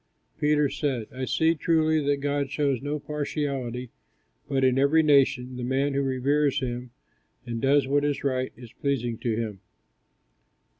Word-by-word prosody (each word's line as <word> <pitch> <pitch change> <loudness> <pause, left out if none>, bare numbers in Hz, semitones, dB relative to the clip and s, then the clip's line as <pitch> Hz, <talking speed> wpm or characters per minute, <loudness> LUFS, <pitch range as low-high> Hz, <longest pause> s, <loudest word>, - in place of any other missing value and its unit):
Peter 150 0 +3
said, 135 -5 -2
"I 130 0 -3
see, 160 +5 +2
truly, 160 -1 +2
that 140 -1 +1
God 140 -1 -1
shows 140 -3 0
no 145 +2 -2
partiality; 140 -5 -3 0.6
but 135 -2 +1
in 130 0 +3
every 150 +4 +4
nation, 135 -4 +3
the 125 - -4
man 135 +3 0
who 140 - +1
reveres 140 +2 +1
him, 125 -1 -4 0.6
and 115 -1 -4
does 140 0 +3
what 145 +1 +2
is 145 -1 -1
right, 130 -2 -1
is 120 -2 -12
pleasing 120 -5 -2
to 115 -3 -1
him." 110 -4 -4
140 Hz, 155 wpm, -26 LUFS, 125-145 Hz, 0.6 s, every